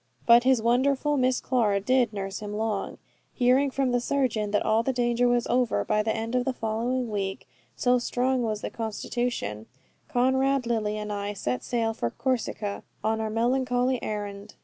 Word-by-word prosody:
But 235 +1 +6
his 260 -4 +3
wonderful 270 +5 +2
Miss 255 -2 +2
Clara 220 -6 +1
did 245 +2 +2
not 205 -2 -4
nurse 195 -1 -5
him 210 0 -6
long. 215 -2 -2 0.4
Hearing 260 +3 +3
from 265 -1 0
the 245 - +2
surgeon 245 -6 0
that 205 0 0
all 220 +1 +3
the 265 - 0
danger 245 -1 +1
was 245 -1 +2
over 240 - +1
by 210 - +2
the 220 +1 0
end 225 +2 -3
of 250 0 +2
the 265 - -1
following 235 +2 -2
week 195 -5 -3 0.3
so 250 0 +2
strong 250 +1 0
was 215 -3 -2
the - - -4
constitution 220 - -3 0.4
Conrad, 265 -1 +2
Lily, 215 -3 -1
and 210 0 -4
I 205 0 -3
set 125 -11 -3
sail 230 -2 0
for 120 - -2
Corsica 225 - -2 0.2
on 220 +1 0
our 220 - -2
melancholy 250 +2 +1
errand. 205 -1 -5
235 Hz, 180 wpm, -26 LUFS, 210-255 Hz, 0.4 s, But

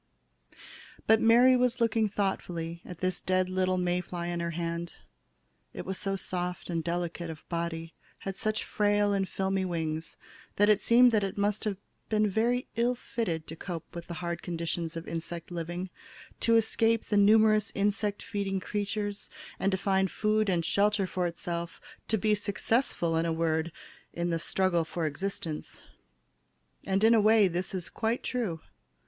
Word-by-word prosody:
But 220 0 +5
Mary 240 +3 +6
was 250 0 +2
looking 225 -2 +2
thoughtfully 170 -4 -2
at 180 -2 -10
this 185 -1 0
dead 185 0 +1
little 185 0 +1
May 180 0 +1
fly 175 -1 -5
in 175 0 -2
her 170 0 -1
hand. 170 0 -3 0.8
It - - -5
was 190 0 -4
so 195 0 -1
soft 180 -2 -4
and 165 -1 -1
delicate 170 0 -3
of 160 -1 -9
body, 165 -1 -3 0.3
had 195 -1 -4
such 215 +1 -1
frail 205 -1 +2
and 195 -2 0
filmy 190 +1 0
wings, 160 -3 -3 0.4
that 205 +1 +4
it 210 -1 +4
seemed 245 +1 +6
that 215 -3 +2
it 195 - -3
must 205 +1 0
have 205 -3 -1 0.3
been 215 -1 +3
very 235 +5 +1
ill 240 +2 +2
fitted 175 -10 -3
to 160 - -8
cope 170 -1 -7
with 170 -1 -7
the 170 - -5
hard 170 0 -4
conditions 170 -1 -3
of 165 - -7
insect 170 +1 -5
living, 175 +2 -4 0.5
to 230 - +3
escape 225 0 +3
the 210 - -1
numerous 215 +1 +5
insect 205 +1 0
feeding 200 -3 -2
creatures 205 +1 -3 0.3
and 195 - +1
to 190 - +1
find 190 -1 +1
food 215 +1 +1
and 170 -3 +1
shelter 205 0 +2
for 180 -1 -1
itself, 170 0 -5 0.3
to 220 - +1
be 215 +1 +2
successful, 205 -3 0
in 165 +1 +1
a - - 0
word, 160 0 0 0.4
in 170 0 -1
the 165 - 0
"struggle 180 0 +1
for 165 +1 -3
existence"! 160 0 -4 1.0
And 195 +1 +1
in 225 +1 +7
a 225 - +5
way, 215 -1 +6
this 180 +2 -2
is 180 -3 -3
quite 225 +2 -2
true. 220 -11 -2
190 Hz, 170 wpm, -29 LUFS, 170-210 Hz, 1.0 s, in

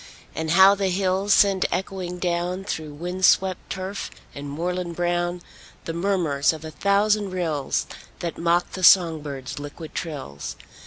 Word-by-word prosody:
And 160 0 -3
how 190 +4 +7
the 200 -1 -1
hills 190 +2 0
send 195 -2 +4
echoing 180 -1 -3
down, 180 +1 -1
Through 155 -6 -5
wind 180 +4 -5
swept 185 0 +3
turf 190 +1 -4 0.2
and 140 0 -7
moorland 175 +3 -3
brown, 175 0 -1 0.4
The 165 - -3
murmurs 170 -6 +1
of 160 0 -9
a 160 - -6
thousand 205 +2 +2
rills 160 -7 -1 0.3
That 170 -2 -4
mock 170 +1 +1
the 185 - -6
song 170 -4 +6
birds' 140 -2 -6
liquid 145 +2 -8
trills! 135 - -5
175 Hz, 150 wpm, -24 LUFS, 160-190 Hz, 0.4 s, how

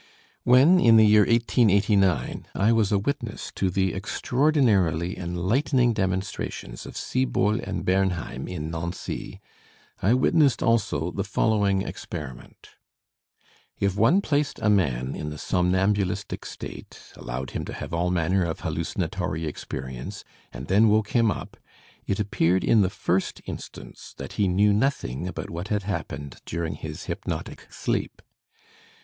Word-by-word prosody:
When, 135 +9 +6
in 115 -7 +6
the 110 - +7
year 105 -1 +6
1889, 100 -5 +2
I 105 +3 +3
was 110 -3 +2
a 100 - +4
witness 120 0 -3
to 95 - 0
the 95 -1 0
extraordinarily 105 - +1
enlightening 115 - +1
demonstrations 95 - -3
of - - -9
Siebault 115 -4 0
and - - -4
Bernheim 95 -2 0
in 80 -3 -5
Nancy, 85 +2 -5 0.6
I 110 +7 +4
witnessed 140 +1 +3
also 90 -8 +1
the 100 - -2
following 100 -2 +1
experiment: 70 -4 -8 1.1
If 100 -1 +1
one 115 - +4
placed 145 -5 0
a 105 - +4
man 65 -10 +1
in 75 - -5
the 75 - -7
somnambulistic 95 +3 0
state, - - -9 0.2
allowed 60 +2 -5
him - - -3
to - - -6
have - - -7
all 85 +1 +1
manner 90 +2 +1
of 85 -1 -3
hallucinatory 80 -1 -2
experience, 65 +4 -6 0.3
and 65 +2 -7
then 100 +7 +4
woke 110 0 +2
him 115 -2 +3
up, - - -5 0.5
it 100 - -1
appeared 95 -3 +1
in 110 - +4
the 95 - +2
first 95 0 -1
instance - - -9
that 70 - -7
he 100 - +1
knew 100 +3 +3
nothing 105 - -1
about 95 - -6
what 85 +3 -5
had 105 -1 -1
happened 80 -7 -5
during 85 -1 -2
his - - -7
hypnotic - - -5
sleep. - - -3
95 Hz, 140 wpm, -25 LUFS, 85-110 Hz, 1.1 s, the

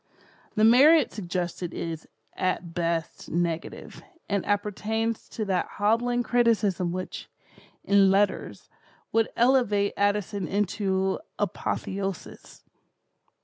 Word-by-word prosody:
The 215 - +2
merit 275 +6 +6
suggested 175 -2 -4
is, 165 -1 -5 0.3
at 180 -2 -2
best, 165 -1 -2
negative, 170 -1 -3 0.3
and 200 -2 0
appertains 215 +2 -1
to 215 - -4
that 190 -2 0
hobbling 240 +4 +1
criticism 210 -8 +1
which, 185 +1 -6 0.5
in 200 -1 +5
letters, 200 +2 0 0.4
would 225 0 +2
elevate 230 -5 +3
Addison 205 -2 0
into 190 -1 0 0.2
apotheosis. 195 -3 -4
200 Hz, 95 wpm, -26 LUFS, 185-225 Hz, 0.5 s, merit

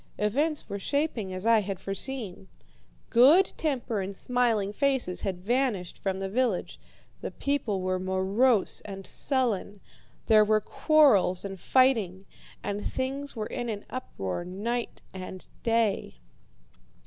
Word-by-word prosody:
Events 290 +9 0
were 200 - -4
shaping 280 -6 -1
as 185 +2 -5
I 230 -1 +6
had 195 -2 -4
foreseen. 195 - -5 0.6
Good 300 +11 +6
temper 250 -8 -1
and 195 +1 -5
smiling 230 -4 +1
faces 265 -7 0
had 185 -2 -4
vanished 235 -7 0
from 190 -1 -3
the 195 - -2
village. 225 -2 -1 0.4
The - - -3
people 260 -9 -1
were 185 0 0
morose 190 +5 +2
and 195 -2 -8
sullen. 225 -7 0 0.5
There 215 -1 +6
were 215 0 +3
quarrels 215 - +3
and 195 -1 -6
fighting, 215 -7 +2 0.4
and 205 +1 -3
things 275 +2 -3
were 215 -2 -3
in 240 +1 -4
an 210 -2 -5
uproar 95 - -4
night 220 +7 -4
and 185 0 -8 0.2
day. 225 - +1
215 Hz, 130 wpm, -28 LUFS, 190-255 Hz, 0.6 s, I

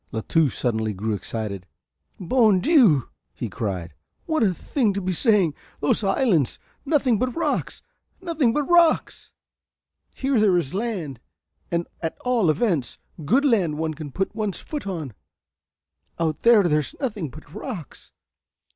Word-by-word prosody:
La 110 - -3
Touche 155 +2 +1
suddenly 110 -3 -1
grew 105 +3 -2
excited. 100 -2 -5 0.5
"Bon 215 0 +3
Dieu," 225 - +4 0.4
cried 95 -6 -4
he, - - -30 0.3
"what 315 -3 0
a 210 -4 +4
thing 215 - -1
to - - 0
be 185 -1 -2
saying! 195 - +3 0.3
Those 145 - +1
islands, 195 - +2 0.3
nothing 275 -7 +2
but 255 -1 -1
rocks 335 - -2 0.4
nothing 330 -9 +1
but 295 +5 0
rocks. 340 +1 +2 0.8
Here 270 -3 +1
there 200 -4 +4
is 160 -4 -2
land, 190 - -3 0.5
at 170 -1 -3
all 240 -8 +2
events, 160 - 0 0.3
good 270 - +3
land 190 - +2
one 160 0 -2
can 150 -2 -8
put 195 +8 -2
one's 210 -3 -3
foot 295 -9 -6
on; 160 - -4 1.0
out 160 -2 -1
there 230 -3 +6
there's 150 -5 0
nothing 210 - -3
but 150 +2 -14
rocks. 210 - -8
185 Hz, 140 wpm, -23 LUFS, 150-240 Hz, 1.0 s, there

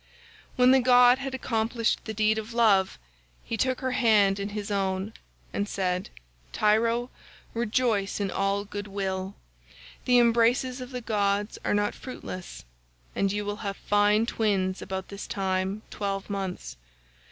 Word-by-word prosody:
When 250 0 +5
the 265 - +6
god 250 0 +6
had 270 -1 -4
accomplished 230 -1 -1
the 220 - -4
deed 215 +1 +2
of 220 +2 -8
love, 205 -5 +3 0.5
he 230 - -3
took 255 +3 0
her 260 -1 -1
hand 210 -5 +3
in 200 +1 -3
his 210 0 -5
own 195 +1 -1 0.4
and 205 +1 -2
said, 185 -1 -1 0.4
'Tyro, 230 +3 +2 0.4
rejoice 230 -3 0
in 200 -2 -1
all 195 +1 0
good 205 0 -6
will; 195 -1 -3 0.7
the 250 -1 +4
embraces 240 +2 +3
of 250 - -7
the 250 -2 -5
gods 205 -2 -1
are - - +1
not 205 0 +1
fruitless, 185 - -8 0.5
and 195 -1 +1
you 205 +1 -2
will 205 0 -3
have 200 -2 -4
fine 205 +2 +3
twins 195 -5 0
about 190 0 -5
this 200 0 -7
time 190 +1 -2
twelve 200 0 -3
months. 195 - -4
210 Hz, 150 wpm, -27 LUFS, 195-235 Hz, 0.7 s, the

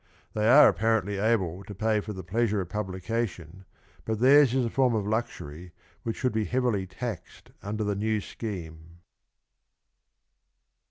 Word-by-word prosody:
They 110 +1 +1
are 145 +4 +9
apparently 105 -2 +1
able 100 -4 0
to 105 -1 -9
pay 110 +2 +1
for 105 - -7
the 95 -2 -7
pleasure 105 +3 0
of 90 -3 -4
publica 105 +3 -2
tion, 90 +1 -13 0.4
but 110 -1 -2
theirs 135 +1 +6
is 130 -1 +1
a - - -1
form 130 -3 +2
of 105 -2 -1
luxury 90 -7 -4 0.3
which 115 - -3
should 125 -3 0
be 110 -1 0
heavily 120 -6 0
taxed 95 -2 -7
under 105 +2 -3
the 105 -1 0
new 110 +2 0
scheme. 85 -6 -8
105 Hz, 155 wpm, -27 LUFS, 95-115 Hz, 0.4 s, are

